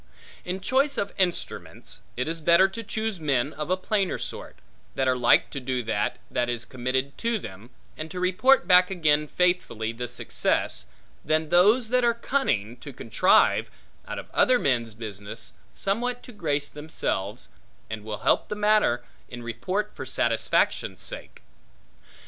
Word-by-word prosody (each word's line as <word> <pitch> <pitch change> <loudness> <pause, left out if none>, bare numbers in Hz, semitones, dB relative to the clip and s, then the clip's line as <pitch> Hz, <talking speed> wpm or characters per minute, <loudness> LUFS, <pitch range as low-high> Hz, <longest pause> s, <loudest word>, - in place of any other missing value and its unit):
In 185 +2 -4
choice 270 +8 +2
of 200 - -2
instruments, 180 -2 -2 0.2
it 125 - -1
is 165 0 -2
better 170 +4 +6
to 195 +4 -7
choose 220 -2 -3
men 140 -2 0
of 150 +1 -5
a 185 - +2
plainer 195 0 0
sort, - - -7 0.4
that 135 - +1
are 130 - +3
like 125 -1 +4
to 140 - -4
do 125 -1 -2
that, 110 0 -1
that 120 0 0
is 120 -1 -3
committed 130 +3 -2
to 235 -1 0
them, 105 - -9 0.3
and 155 +1 -6
to 180 - -6
report 185 +5 +4
back 180 +1 +6
again 150 -5 +2
faithfully 175 -12 0
the 120 +2 -5
success, 90 - -1 0.4
than 155 0 +1
those 215 +8 +4
that 250 0 +3
are 235 -1 +3
cunning, 125 - -1
to 140 +3 -9
contrive, 115 -3 +3 0.4
out - - -5
of - - -8
other 255 0 +4
men's 120 - 0
business, 110 0 -7 0.2
somewhat 240 +5 -1
to - - -10
grace 150 -9 -1
themselves, 105 - -4 0.4
and 110 -1 -6
will 105 -1 -5
help - - +3
the 210 - -3
matter 210 - +3 0.3
in 120 -1 -8
report 185 - -2
for - - -6
satisfaction's 115 -2 +1
sake. - - -5
155 Hz, 160 wpm, -26 LUFS, 120-195 Hz, 0.4 s, better